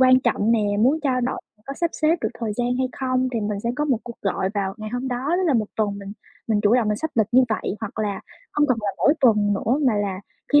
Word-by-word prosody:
quan 255 Hz, 0 st, +6 dB
trọng 230 Hz, -3 st, +1 dB
nè 230 Hz, -, +3 dB, 0.2 s
muốn 275 Hz, +7 st, +3 dB
trao 260 Hz, -4 st, +1 dB
đổi, 250 Hz, +1 st, -2 dB, 0.3 s
có 275 Hz, -, -5 dB
sắp 340 Hz, +2 st, -1 dB
xếp 315 Hz, +2 st, +2 dB
được -, -, 0 dB
thời 225 Hz, -2 st, -1 dB
gian 245 Hz, 0 st, 0 dB
hay 260 Hz, 0 st, +1 dB
không? 255 Hz, -1 st, 0 dB
Thì 230 Hz, -, -1 dB
mình 205 Hz, -1 st, -2 dB
sẽ 235 Hz, -, -1 dB
có 295 Hz, -, 0 dB
một 265 Hz, -7 st, +1 dB
cuộc 235 Hz, -, -9 dB
gọi 195 Hz, -1 st, 0 dB
vào 195 Hz, -1 st, -1 dB
ngày 215 Hz, 0 st, -7 dB
hôm 245 Hz, +2 st, -2 dB
đó, 250 Hz, +2 st, -3 dB
tức 375 Hz, -, 0 dB
là 295 Hz, -, +3 dB
một 215 Hz, -3 st, +1 dB
tuần 205 Hz, -2 st, 0 dB
mình 200 Hz, 0 st, -8 dB, 0.4 s
mình 210 Hz, -2 st, +2 dB
chủ 210 Hz, +3 st, +4 dB
động 235 Hz, -4 st, +2 dB
mình 210 Hz, -, +1 dB
sắp 320 Hz, +7 st, -3 dB
lịch 220 Hz, -3 st, +3 dB
như 255 Hz, +2 st, +7 dB
vậy, 215 Hz, -2 st, -2 dB
hoặc 220 Hz, 0 st, -6 dB
là 205 Hz, -2 st, -1 dB, 0.3 s
hông 295 Hz, 0 st, +3 dB
cần 255 Hz, -3 st, +1 dB
là 205 Hz, -, -1 dB
mỗi 290 Hz, -, +4 dB
tuần 210 Hz, -5 st, +4 dB
nữa 235 Hz, +7 st, 0 dB
mà 225 Hz, -, +3 dB
là 200 Hz, -2 st, -2 dB, 0.3 s
khi 290 Hz, -, +8 dB
235 Hz, 275 wpm, -23 LUFS, 210-260 Hz, 0.4 s, khi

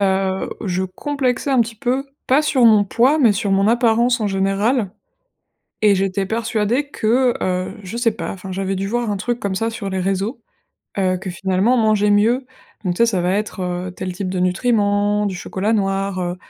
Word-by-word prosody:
Heu, 190 Hz, -1 st, 0 dB
je 185 Hz, 0 st, -1 dB
complexais 260 Hz, +6 st, -2 dB
un 260 Hz, -3 st, +4 dB
petit 225 Hz, 0 st, -1 dB
peu, 255 Hz, +4 st, -1 dB, 0.2 s
pas 275 Hz, +4 st, +4 dB
sur 265 Hz, -5 st, +2 dB
mon 215 Hz, -3 st, +6 dB
poids, 255 Hz, +9 st, +2 dB
mais 235 Hz, -7 st, +5 dB
sur 200 Hz, 0 st, -2 dB
mon 195 Hz, +1 st, +3 dB
apparence, 235 Hz, +1 st, +3 dB
en 210 Hz, -, 0 dB
général 195 Hz, +3 st, 0 dB, 0.9 s
et 200 Hz, -1 st, +6 dB
j'étais 195 Hz, +1 st, -1 dB
persuadée 230 Hz, +5 st, -1 dB
que, 245 Hz, +3 st, +2 dB
heu, 185 Hz, 0 st, -2 dB
je 190 Hz, +5 st, -6 dB
sais 235 Hz, -1 st, +2 dB
pas, -, -, -4 dB
enfin, 190 Hz, -1 st, -7 dB
j'avais 195 Hz, 0 st, -2 dB
dû 195 Hz, +1 st, -2 dB
voir 235 Hz, 0 st, -1 dB
un 200 Hz, -, -2 dB
truc 240 Hz, +4 st, -3 dB
comme 200 Hz, -2 st, -2 dB
ça 225 Hz, +4 st, -1 dB
sur 215 Hz, -3 st, -5 dB
les 190 Hz, 0 st, -2 dB
réseaux, 195 Hz, +6 st, -2 dB, 0.6 s
heu, 185 Hz, -1 st, +1 dB
que 185 Hz, 0 st, -6 dB
finalement 190 Hz, +7 st, +1 dB
manger 215 Hz, -2 st, +3 dB
mieux. 230 Hz, +6 st, +3 dB, 0.4 s
Donc 180 Hz, -, +1 dB
tu -, -, -8 dB
sais 235 Hz, -, +5 dB
ça 190 Hz, -6 st, 0 dB
va 180 Hz, +1 st, +1 dB
être, 205 Hz, -1 st, -2 dB, 0.3 s
heu, -, -, -6 dB
tel 185 Hz, 0 st, -5 dB
type 190 Hz, +1 st, -4 dB
de 185 Hz, 0 st, -3 dB
nutriments, 205 Hz, +1 st, +1 dB
du 195 Hz, -2 st, -2 dB
chocolat 195 Hz, +4 st, -2 dB
noir, 195 Hz, -2 st, -1 dB
heu, 175 Hz, 0 st, -3 dB
205 Hz, 200 wpm, -20 LUFS, 190-235 Hz, 0.9 s, mon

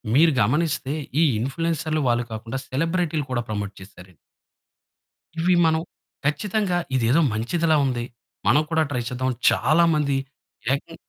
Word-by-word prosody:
మీరు 160 Hz, +2 st, +5 dB
గమనిస్తే 145 Hz, +3 st, 0 dB, 0.3 s
ఈ -, -, +5 dB, 0.2 s
ఇంప్ల్యూయన్సర్‌లు 155 Hz, +2 st, -1 dB
వాళ్ళు 120 Hz, 0 st, +1 dB
కాకుండా 115 Hz, +4 st, -5 dB
సెలబ్రిటీ‌లు 165 Hz, +1 st, -1 dB
కూడా 120 Hz, -1 st, 0 dB
ప్రమోట్ 105 Hz, -1 st, -3 dB
చేసారండి. 95 Hz, -2 st, -14 dB, 1.2 s
ఇవి 180 Hz, +2 st, +3 dB
మనం 160 Hz, 0 st, +2 dB, 0.4 s
ఖచ్చితంగా 185 Hz, +4 st, 0 dB, 0.2 s
ఇదేదో 125 Hz, +6 st, +3 dB
మంచిదిలా 160 Hz, +9 st, +1 dB
ఉంది, 120 Hz, -2 st, -1 dB, 0.4 s
మనం 150 Hz, -, +5 dB
కూడా 160 Hz, -1 st, +3 dB
ట్రై 125 Hz, -4 st, -1 dB
చేద్దాం 130 Hz, +1 st, -1 dB, 0.2 s
చాలా 155 Hz, +7 st, +3 dB
మంది 140 Hz, -3 st, +1 dB, 0.6 s
ఏకం 155 Hz, +4 st, -4 dB
145 Hz, 125 wpm, -23 LUFS, 120-165 Hz, 1.2 s, మీరు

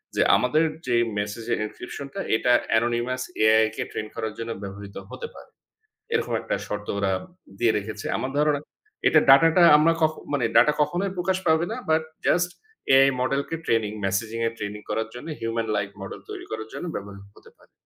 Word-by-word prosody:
যে, -, -, +2 dB
আমাদের 150 Hz, +6 st, +2 dB, 0.2 s
যে 120 Hz, -, +2 dB, 0.2 s
মেসেজ 105 Hz, +2 st, -3 dB
এর -, -, -1 dB
encryption 140 Hz, +5 st, -8 dB
টা -, -, -5 dB, 0.2 s
এটা 125 Hz, -, +2 dB, 0.3 s
anonymous 120 Hz, +2 st, 0 dB, 0.2 s
AI 110 Hz, 0 st, +6 dB
কে -, -, -2 dB
ট্রেইন 110 Hz, -, -4 dB
করার 110 Hz, -2 st, -3 dB
জন্য 115 Hz, 0 st, -4 dB
ব্যবহৃত 100 Hz, 0 st, -8 dB, 0.2 s
হতে 470 Hz, -, -6 dB
পারে। -, -, -13 dB, 0.6 s
এরকম 450 Hz, -, 0 dB
একটা -, -, -2 dB
শর্ত 105 Hz, 0 st, -5 dB
ওরা 100 Hz, -1 st, +1 dB, 0.5 s
দিয়ে 115 Hz, -2 st, +4 dB
রেখেছে। 105 Hz, 0 st, -6 dB
আমার 130 Hz, -, -3 dB
ধারণা 150 Hz, -1 st, +2 dB, 0.5 s
এটা 155 Hz, -, +6 dB
ডাটাটা 165 Hz, +6 st, +7 dB
আমরা 165 Hz, +2 st, +4 dB
কখ 155 Hz, 0 st, +4 dB, 0.2 s
মানে, 130 Hz, -5 st, +1 dB
ডাটা 150 Hz, -, +6 dB
কখনোই 180 Hz, +6 st, 0 dB
প্রকাশ 185 Hz, +1 st, 0 dB
পাবে 160 Hz, +1 st, +3 dB
না। 225 Hz, -, -3 dB
But, 160 Hz, 0 st, +3 dB, 0.2 s
just 175 Hz, 0 st, +3 dB, 0.5 s
AI 135 Hz, 0 st, +7 dB
model 135 Hz, +2 st, +1 dB
K 165 Hz, -, -2 dB
training 110 Hz, -2 st, +1 dB
messaging 110 Hz, +4 st, -1 dB
এর 115 Hz, -, -3 dB
ট্রেনিং 105 Hz, 0 st, -5 dB
করার 110 Hz, 0 st, -1 dB
জন্য 125 Hz, +6 st, -9 dB
human 115 Hz, 0 st, -2 dB
like 100 Hz, 0 st, -2 dB
model 95 Hz, -, -7 dB
তৈরি -, -, -7 dB
করার 110 Hz, 0 st, -4 dB
জন্য, -, -, -5 dB
ব্যবহার 100 Hz, 0 st, -7 dB, 0.2 s
হতে -, -, -17 dB
পারে। -, -, -25 dB
120 Hz, 185 wpm, -25 LUFS, 110-150 Hz, 0.6 s, ডাটাটা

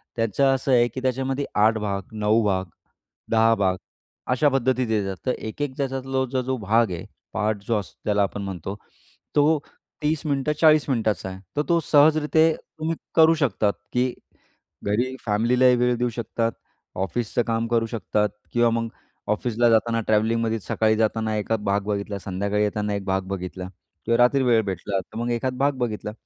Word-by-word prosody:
त्याचं 115 Hz, +4 st, +1 dB
असं 135 Hz, +1 st, -2 dB
आहे 120 Hz, -1 st, +5 dB
की 130 Hz, +3 st, -7 dB
त्याच्यामध्ये 135 Hz, +2 st, -1 dB
8 110 Hz, +2 st, +4 dB
भाग, 100 Hz, -2 st, -2 dB
9 110 Hz, +1 st, +2 dB
भाग, 95 Hz, -2 st, +1 dB, 0.7 s
10 115 Hz, 0 st, +4 dB
भाग 95 Hz, -2 st, +1 dB, 0.5 s
अशा 145 Hz, +3 st, +3 dB
पद्धतीत 130 Hz, -2 st, +1 dB
येतात. 100 Hz, -3 st, 0 dB
तर 130 Hz, -, +2 dB
एक-एक 130 Hz, +5 st, -5 dB
त्याच्यातला 130 Hz, -1 st, -1 dB
जो 130 Hz, +1 st, -2 dB
भाग 110 Hz, 0 st, +2 dB
आहे, 85 Hz, -2 st, -5 dB, 0.3 s
पार्ट 105 Hz, -1 st, -1 dB
जो 115 Hz, -, +2 dB
असतो 100 Hz, -, -11 dB
ज्याला 105 Hz, -1 st, +2 dB
आपण 100 Hz, +1 st, -3 dB
म्हणतो, 95 Hz, 0 st, -5 dB, 0.6 s
तो 150 Hz, +1 st, +4 dB, 0.4 s
30 155 Hz, +1 st, 0 dB
मिनिटं, 140 Hz, +1 st, 0 dB
40 155 Hz, -2 st, +5 dB
मिनिटाचा 110 Hz, -6 st, 0 dB
आहे. 95 Hz, 0 st, -8 dB, 0.2 s
तर -, -, +4 dB
तो 170 Hz, -1 st, +4 dB
सहजरीत्या 155 Hz, +2 st, +5 dB, 0.3 s
तुम्ही 165 Hz, +1 st, -1 dB, 0.2 s
करू 160 Hz, 0 st, +7 dB
शकतात, 105 Hz, -4 st, +1 dB, 0.2 s
की 125 Hz, 0 st, +1 dB, 0.7 s
घरी 120 Hz, +6 st, 0 dB
फॅमिलीलाही 125 Hz, +4 st, +3 dB
वेळ 125 Hz, 0 st, +2 dB
देऊ 120 Hz, 0 st, 0 dB
शकतात, 115 Hz, 0 st, -2 dB, 0.4 s
ऑफिसचं 105 Hz, +5 st, -1 dB
काम 115 Hz, 0 st, 0 dB
करू 115 Hz, -1 st, +1 dB
शकतात 105 Hz, -2 st, -1 dB, 0.2 s
किंवा 120 Hz, 0 st, +4 dB
मग 115 Hz, 0 st, -1 dB, 0.4 s
ऑफिसला 120 Hz, +2 st, +2 dB
जाताना 115 Hz, 0 st, +2 dB
ट्रॅव्हलिंगमध्ये 110 Hz, +1 st, +1 dB
सकाळी 110 Hz, +2 st, +1 dB
जाताना 110 Hz, 0 st, 0 dB
एखाद 105 Hz, +1 st, -1 dB
भाग 100 Hz, +1 st, +1 dB
बघितला. 100 Hz, -1 st, -2 dB
संध्याकाळी 100 Hz, +2 st, -1 dB
येताना 105 Hz, 0 st, -1 dB
एक 100 Hz, -, -4 dB
भाग 95 Hz, 0 st, 0 dB
बघितला 90 Hz, -1 st, -5 dB, 0.4 s
किंवा 115 Hz, +1 st, +2 dB
रात्री 130 Hz, +2 st, +4 dB
वेळ 115 Hz, -3 st, +4 dB
भेटला, 95 Hz, 0 st, -2 dB
तर 95 Hz, -, -10 dB
मग 120 Hz, +1 st, -1 dB
एखाद 125 Hz, +2 st, -2 dB
भाग 140 Hz, +1 st, +2 dB
बघितला. 105 Hz, -3 st, -2 dB
115 Hz, 165 wpm, -24 LUFS, 105-130 Hz, 0.7 s, करू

